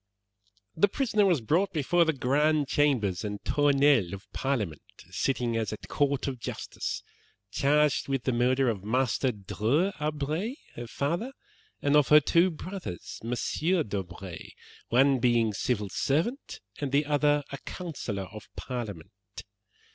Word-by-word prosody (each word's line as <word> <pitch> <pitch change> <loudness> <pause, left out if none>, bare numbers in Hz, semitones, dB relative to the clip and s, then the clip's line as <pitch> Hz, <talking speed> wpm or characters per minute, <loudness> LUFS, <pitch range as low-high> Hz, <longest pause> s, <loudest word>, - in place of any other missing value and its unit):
"'The 185 +6 +4
prisoner 215 -3 +1
was 170 -8 +2
brought 175 - +1
before 170 +2 +2
the 160 - +3
Grand 145 +2 +1
Chambers 125 -12 +1
and 105 -1 -4
Tournelles 140 -9 +3
of 100 +1 -8
Parliament, 110 - -2 0.3
sitting 120 -3 0
as 110 -2 -1
a 110 - -4
court 140 +3 -1
of 130 -3 -4
justice, - - -5 0.5
charged 150 +4 +2
with 135 -3 -1
the 130 - +1
murder 130 +2 +2
of 105 -5 -1
Master 125 +3 +1
Dreux 115 - 0
d'Aubray, 150 - -2 0.2
her 120 0 -6
father, 170 - -2 0.5
and 145 +1 +3
of 150 -2 +5
her 150 - +8
two 170 +5 +3
brothers, 180 - -7
MM. 155 +7 0
d'Aubray, 95 -3 -6 0.4
one 135 +2 +4
being 115 -3 +2
civil 105 0 -1
lieutenant, 160 - -1 0.2
and 140 -3 -2
the 145 +2 +3
other 145 0 +2
a 140 - -6
counsellor 135 - -5
of 105 - -10
Parliament. 100 -6 -7
135 Hz, 140 wpm, -28 LUFS, 115-150 Hz, 0.5 s, her